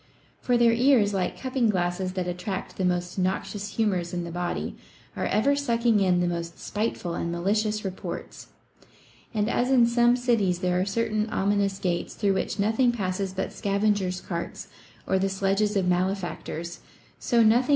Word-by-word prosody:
For 245 -1 +2
their 235 -1 +5
ears, 235 -4 +4
like 190 -2 -1
cupping 255 -3 0
glasses 185 -1 -1
that 185 -1 -2
attract 180 +2 -4
the 190 - -1
most 180 +1 -1
noxious 195 +2 -2
humors 185 -6 0
in 175 - -2
the 170 - -6
body, 175 +1 -3 0.4
are - - -1
ever 280 +7 +2
sucking 235 -5 +2
in 180 -2 +3
the 175 - +1
most 170 -1 -4
spiteful 210 -5 -3
and 170 0 -2
malicious 210 +4 0
reports; 190 -1 -6 0.8
and, 210 -2 0
as 245 +2 +1
in 255 -3 +6
some 240 +1 +4
cities 230 -8 +1
there 180 -1 +1
are - - +1
certain 215 +1 -1
ominous 200 -1 +1
gates 175 -3 -2
through 200 -2 +1
which 190 - -2
nothing 220 +5 +3
passes 195 -3 -2
but 190 0 -4
scavenger's 200 -2 0
carts 170 -2 -5 0.4
or 190 - +1
the 195 +1 +1
sledges 195 +2 +1
of 190 -2 +1
malefactors, 175 -2 -2 0.4
so 235 -2 +3
nothing 230 +3 +5
£? - - -9
195 Hz, 170 wpm, -26 LUFS, 180-225 Hz, 0.8 s, in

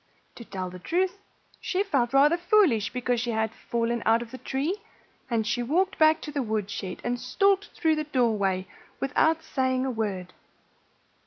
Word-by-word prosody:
To 235 - -10
tell 185 -4 -5
the 180 - -9
truth, 365 - -1 0.4
she 385 +1 0
felt 270 -11 0
rather 285 +4 +5
foolish 345 - +3
because 245 -1 -1
she 240 - -2
had 220 -1 0
fallen 235 0 -2
out 225 +1 +3
of 230 - -13
the 260 - -8
tree. 290 +9 -2 0.5
And 225 -3 0
she 215 +3 0
walked 360 +11 0
back 315 0 +5
to 300 - -6
the 285 -1 -1
woodshed 210 -4 -3
and 245 0 -1
stalked 390 +11 +2
through 315 -2 +3
the 305 - -2
doorway 210 -9 +1 0.3
without 320 +4 +2
saying 260 -3 0
a 265 - -1
word. 195 -6 -3
250 Hz, 170 wpm, -27 LUFS, 220-315 Hz, 0.5 s, rather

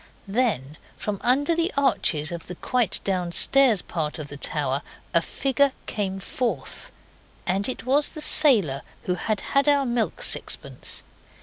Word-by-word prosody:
Then 195 - -1 0.2
from 205 -2 -4
under 285 +7 +3
the 335 +3 0
arches 170 - +1
of 170 -1 -7
the 180 - -7
quite 245 +3 +1
downstairs 195 +5 +3
part 155 -3 -3
of 150 -3 -7
the 145 - -7
tower 140 -1 -2 0.3
a 170 - +5
figure 275 - +1
came 195 -2 -3
forth 195 - -4 0.5
and 195 +5 0
it 255 - -6
was 285 +3 +2
the - - -9
sailor 215 - +6 0.2
who 180 - -1
had 205 +3 -2
had 280 +1 +4
our 285 -1 +3
milk 240 - -1
sixpence. - - -4
210 Hz, 145 wpm, -24 LUFS, 170-270 Hz, 0.5 s, sailor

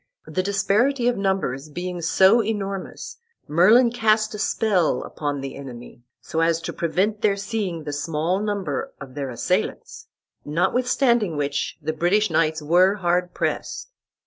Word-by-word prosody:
The 185 - -2
disparity 215 +7 +1
of 245 - +2
numbers 190 -8 -1
being 175 +3 -5
so 190 +7 +5
enormous, 200 -3 -4 0.3
Merlin 215 +10 +5
cast 215 -2 +2
a 210 - -6
spell 200 -5 +1
upon 145 -2 -4
the 135 0 -6
enemy, 120 -3 -10 0.2
so 160 - -4
as 165 0 +2
to - - -5
prevent 190 +6 -1
their 205 -2 +3
seeing 200 -5 -3
the 145 -1 -5
small 155 +5 -1
number 200 -9 -3
of 135 -2 -10
their 140 -1 -4
assailants; 120 - -2 0.4
notwithstanding 235 - +1
which 145 0 -2
the 155 +1 -1
British 175 +5 +1
knights 155 -1 +1
were 180 +6 +4
hard 180 -2 0
pressed. - - -3
180 Hz, 145 wpm, -23 LUFS, 155-210 Hz, 0.4 s, so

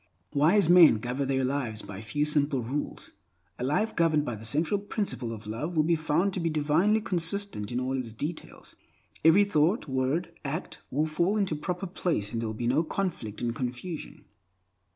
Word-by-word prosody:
Wise 160 +6 +4
men 170 -9 +8
govern 125 +5 -3
their 135 -1 +1
lives 125 -5 -2
by 100 -1 -8
a - - -8
few 130 +7 -1
simple 145 -4 +1
rules. 115 - -4 0.5
A - - -3
life 185 - 0
governed 155 -3 +2
by 125 - -3
the 110 0 -8
central 155 - +1
principle 200 - -3
of 110 -2 -8
love 125 +11 -4
will 155 - +4
be 170 +2 +3
found 160 +5 +1
to 185 - -1
be 165 -1 0
divinely 160 +8 +2
consistent 180 - -1
in 120 - -1
all 130 +1 -1
its 125 -4 -4
details. 150 +9 -7 0.5
Every 165 +6 +7
thought, 170 -1 +1
word, 140 +6 -1
act, 150 +5 -4
will 150 +4 +1
fall 170 +6 +1
into 195 -6 0
proper 180 +5 -3
place, 170 - -2
and 115 - -1
there 115 - -2
will 110 - -5
be 120 - -3
no 135 +7 +2
conflict 155 - -3
and 120 -1 0
confusion. 125 +8 -6
150 Hz, 190 wpm, -28 LUFS, 125-175 Hz, 0.5 s, men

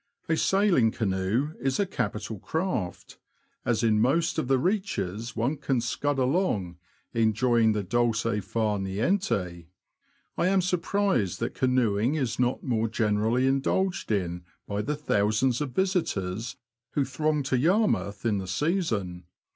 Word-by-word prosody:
A 160 - +2
sail 195 +3 +3
ing 115 -3 +5
canoe 110 +7 -1
is 135 0 -1
a 200 - +3
capital 110 - -3
craft, 160 - -3 0.4
as 120 -2 0
in 110 -2 +3
most 160 +7 +2
of 155 - -2
the 135 0 +3
reaches 125 - -2
one 120 +7 0
can 135 -2 0
scud 140 +4 -1
along, 125 - 0 0.3
enjoying 115 0 +3
the 105 -1 -1
dolce 115 +1 +1
far 105 +1 -1
niente. 95 - -1 0.7
I 175 - +3
am 195 +1 +3
surprised 180 - 0
that 115 - -2
canoeing 125 -1 +1
is 125 -6 -2
not 125 0 +1
more 115 -4 0
generally 110 +2 +1
indulged 160 +6 0
in 90 -4 -1 0.2
by 100 0 -2
the 150 +7 -2
thouoands 120 -2 +1
of 140 -4 -3
visitors 120 - -1 0.4
who 140 - +1
throng 150 +2 0
to 130 -1 0
Yarmouth 175 - +1
in 105 -3 +1
the 95 - -5
season. 100 - -1
120 Hz, 140 wpm, -27 LUFS, 105-150 Hz, 0.7 s, ing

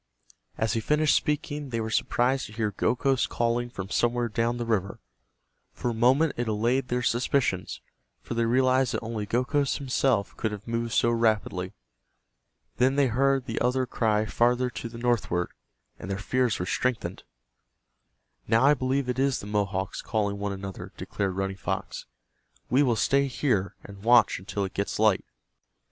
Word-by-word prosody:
As 110 -2 0
he 115 - 0
finished 150 +6 +2
speaking 150 -1 -1
they 115 -2 -2
were 110 0 -3
surprised 130 +4 +1
to 110 - -13
hear 110 -2 -1
Gokhos 125 +5 +1
calling 120 +1 0
from 100 -4 -7
somewhere 120 0 +1
down 115 +2 0
the 120 - -3
river. 100 -4 -1 0.7
For 120 - -2
a - - -3
moment 130 +7 +3
it 120 0 -1
allayed 120 +5 +1
their 125 0 -1
suspicions, 120 -6 0 0.4
for - - -6
they 115 0 +1
realized 130 +1 +2
that - - -3
only 110 -2 -4
Gokhos 135 +4 +1
himself 130 -6 0
could 110 - -1
have 105 +1 -8
moved 115 0 -2
so 115 - +3
rapidly. 105 -5 0 1.0
Then 130 +2 +3
they 140 -1 +4
heard 135 +2 +2
the - - -3
other 130 +2 +1
cry 110 -3 +1
farther 120 +3 +1
to 115 - -6
the 115 - -10
northward, 115 -7 0 0.5
and - - -7
their 95 - -2
fears 125 +3 0
were 90 - -3
strengthened. 125 +5 -2 1.3
"Now 115 +2 +3
I 145 - +7
believe 135 -1 -1
it 125 +1 -2
is 135 -1 +2
the - - -8
Mohawks 100 -2 -2
calling 100 -2 -1
one 100 0 -2
another," 95 -1 -7
declared 95 -2 -3
Running 95 0 -2
Fox. 95 +2 -4 0.6
"We 130 +3 +5
will 125 -5 +3
stay 140 +6 +2
here, 120 -7 0
and 100 -1 -11
watch 120 -3 +5
until 100 +2 -3
it 95 - -7
gets 100 - -2
light." 110 -3 +3
115 Hz, 170 wpm, -27 LUFS, 105-130 Hz, 1.3 s, I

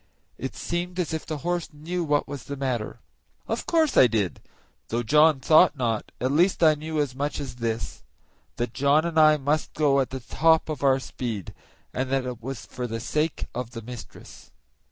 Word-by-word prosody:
It 130 - -5
seemed 175 +1 -3
as 170 -2 -1
if 160 - -4
the 155 - -3
horse 175 -1 -1
knew 165 +4 -4
what 150 -2 +1
was 140 -4 -7
the 140 - -6
matter. 120 -4 -3 0.5
Of 225 - -3
course 320 -4 +2
I 125 - +8
did, 105 -6 -1 0.5
though 120 +1 -1
John 150 +4 +5
thought 155 +3 +5
not; 115 -4 -1
at 130 +1 0
least 175 +4 +3
I 155 -1 +7
knew 155 +1 -4
as 145 -4 0
much 145 +3 -3
as 130 -4 -6
this 115 -2 -3 0.5
that 120 -1 -3
John 140 +4 +3
and 165 -2 +1
I 155 -1 +7
must 150 +2 -1
go 145 -3 +3
at 135 - 0
the 130 - -5
top 160 +6 +2
of 155 - -4
our 135 -1 +4
speed, 115 -7 -5 0.4
and 130 +1 -2
that 135 -1 +1
it 125 -2 -5
was 120 -4 -6
for 125 +4 -5
the 115 0 -4
sake 150 +6 -1
of 125 -1 -4
the 115 -2 -7
mistress. 120 0 -11
140 Hz, 195 wpm, -25 LUFS, 125-155 Hz, 0.5 s, I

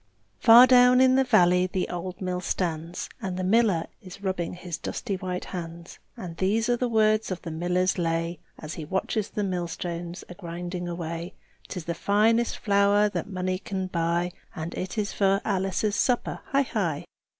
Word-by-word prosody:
Far 235 +1 +9
down 250 0 +6
in 260 0 +6
the 265 +1 +4
valley 180 -6 +4
the 185 0 -2
old 180 +1 -5
mill 180 -1 -2
stands, 170 -2 -3
And 185 -2 -3
the 185 - -2
miller 195 -4 +3 0.2
is 190 +1 -12
rubbing 185 -3 -2
his 175 -2 -6
dusty 205 -5 -3
white 180 -1 -4
hands; 170 -1 -8 0.2
And 170 -2 -7
these 215 +6 +1
are 245 - +4
the 245 0 -1
words 215 -1 +2
of 185 -2 -5
the 165 - -5
miller's 180 +3 0
lay, 165 0 -1 0.2
As 155 0 -7
he 160 - -6
watches 190 +5 -2
the 210 - -3
millstones 175 -1 -4
a - - -9
grinding 175 0 -6
away: 170 0 -5 0.3
"'Tis 180 -4 -6
the 170 - -2
finest 220 +6 +2
flour 200 0 +3
that 205 - -4
money 185 -1 -2
can 190 -1 -4
buy, 170 0 0 0.2
And 160 +1 -5
it 185 +5 -5
is 210 -1 -1
for 195 -1 +2
Alice's 195 +1 0
supper, 245 -2 0
hi! 210 - 0
185 Hz, 175 wpm, -26 LUFS, 175-205 Hz, 0.3 s, Far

